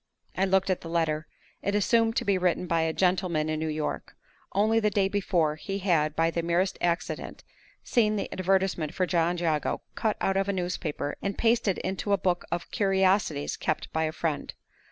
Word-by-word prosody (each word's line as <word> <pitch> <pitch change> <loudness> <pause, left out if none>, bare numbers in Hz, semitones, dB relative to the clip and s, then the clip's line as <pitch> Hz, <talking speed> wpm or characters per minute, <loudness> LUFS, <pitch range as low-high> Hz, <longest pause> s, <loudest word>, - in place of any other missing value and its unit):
I 190 - +2
looked 190 0 +2
at 185 - -1
the 165 - -8
letter. 160 -2 0 0.3
It 200 - -1
assumed 225 +2 +3
to 240 - 0
be 200 -2 +2
written 180 0 +1
by 165 -1 +1
a 160 0 +1
gentleman 180 -3 +1
in 155 0 -1
New 160 - -2
York. 155 -1 -3 0.4
Only 220 +3 +3
the 210 -1 +2
day 200 -1 +2
before, 175 -6 0
he 195 +5 -4
had, 165 -6 +1
by 165 0 +2
the 170 - -1
merest 170 +3 0
accident, 170 0 -2 0.4
seen 215 -4 +2
the 205 - -2
advertisement 185 -4 0
for 185 - +1
John 175 0 +1
Jago 160 -3 0
cut 220 -2 -1
out 195 0 +1
of 195 0 0
a - - +1
newspaper 175 -5 -3
and 200 0 -3
pasted 225 -4 +2
into 190 +2 -2
a - - +4
book 180 -2 0
of 175 0 -3
"curiosities" 190 -6 +1
kept - - -3
by 160 0 +1
a 155 - -1
friend. 160 -2 -3
180 Hz, 195 wpm, -27 LUFS, 165-195 Hz, 0.4 s, a